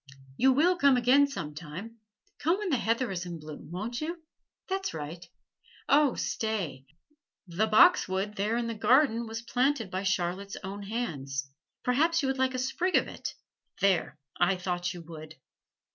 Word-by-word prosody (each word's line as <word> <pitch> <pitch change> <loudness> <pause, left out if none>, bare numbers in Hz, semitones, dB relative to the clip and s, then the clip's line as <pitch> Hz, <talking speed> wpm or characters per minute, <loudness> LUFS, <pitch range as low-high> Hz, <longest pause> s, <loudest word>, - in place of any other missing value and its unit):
You 265 - +4
will 340 +7 +3
come 280 -4 +5
again 260 +4 +5
some 160 - -5
time, 180 +9 -8 0.4
come 335 +4 +2
when 415 -2 -3
the 270 - +3
heather 230 0 0
is 180 -1 -3
in 170 -1 -5
bloom, 155 -1 -10
won't 215 - -4
you? 330 +2 -4 0.4
That's 385 - -2
right. 160 +3 -6 0.6
Oh, 285 -2 +4
stay! 175 -12 -3 0.6
the 185 +5 0
boxwood 210 - +4
there 215 +3 0
in 240 - -1
the 230 - -2
garden 235 +1 +3
was 225 +1 -5
planted 250 -3 0
by 185 - -2
Charlotte's 190 +1 -1
own 200 +1 -6
hands 140 - -4 0.3
perhaps 315 +6 +2
you - - +1
would 265 0 -2
like 260 0 +1
a - - -1
sprig 340 +9 0
of - - +3
it - - -6 0.4
there, 190 -6 +2 0.2
I 175 +2 +4
thought 180 -1 -2
you 175 -2 -8
would! 160 -1 -10
220 Hz, 165 wpm, -29 LUFS, 175-260 Hz, 0.6 s, come